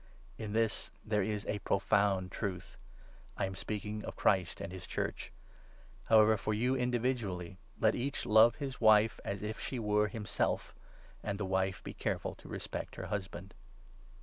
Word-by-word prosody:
In 105 -2 -4
this 110 -2 +1 0.2
there 105 -1 +1
is 105 +1 -2
a 105 - -2
profound 95 -1 +2
truth 95 -4 -4 0.3
— - - -24
I - - +1
am 95 - -4
speaking 105 +2 -4
of - - -6
Christ 95 -4 +2
32 - - -6
and 95 -2 -6
his 95 - -8
Church. - - -3 0.7
However, 110 0 +6
for 110 +1 -1
you 125 +4 +2
individually, 120 -8 -1 0.2
let 110 -1 +4
each 135 +3 -2
love 110 +2 +7
33 145 - -5
his 130 -2 -7
wife 110 0 +5
as 100 +1 -4
if 110 +1 -4
she 130 - -3
were 105 -2 +2
himself; 105 +1 -1 0.5
and 100 -1 -3
the 100 - -2
wife 95 0 0
be - - -6
careful - - -2
to - - -15
respect - - -5
her - - -5
husband. 95 -1 -5
105 Hz, 175 wpm, -33 LUFS, 95-110 Hz, 0.7 s, love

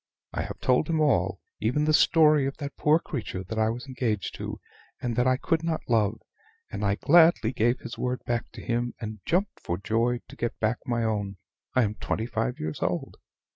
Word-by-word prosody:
I - - -1
have - - -6
told 130 +5 +2
him 160 -1 +1
all 150 -2 +2 0.2
even 125 +8 +1
the 155 - +3
story 150 -3 +5
of 135 - -5
that 140 -2 -6
poor 150 +1 +4
creature 115 - -5
that 110 +4 -4
I 110 0 +3
was 120 +3 -4
engaged 120 -6 -2
to - - -5 0.4
and 120 -2 -2
that 125 +1 +2
I 130 0 +3
could 165 +3 0
not 165 -1 -2
love; 110 -2 +2 0.5
and - - -4
I 100 0 +2
gladly 160 -4 +5
gave 120 +2 +1
his 120 - -7
word 125 0 -2
back 120 0 -1
to - - -9
him, 120 0 -1
and 110 -2 -6
jumped 190 +4 0
for 85 - -3
joy 115 +5 0
to - - -12
get 120 - -3
back 110 +2 +1
my 120 -1 0
own. 100 -3 -1 0.4
I 130 - +5
am 105 -1 0
twenty 110 - -2
five 115 +1 -2
years 75 0 -4
old." - - -2
120 Hz, 210 wpm, -27 LUFS, 110-140 Hz, 0.5 s, story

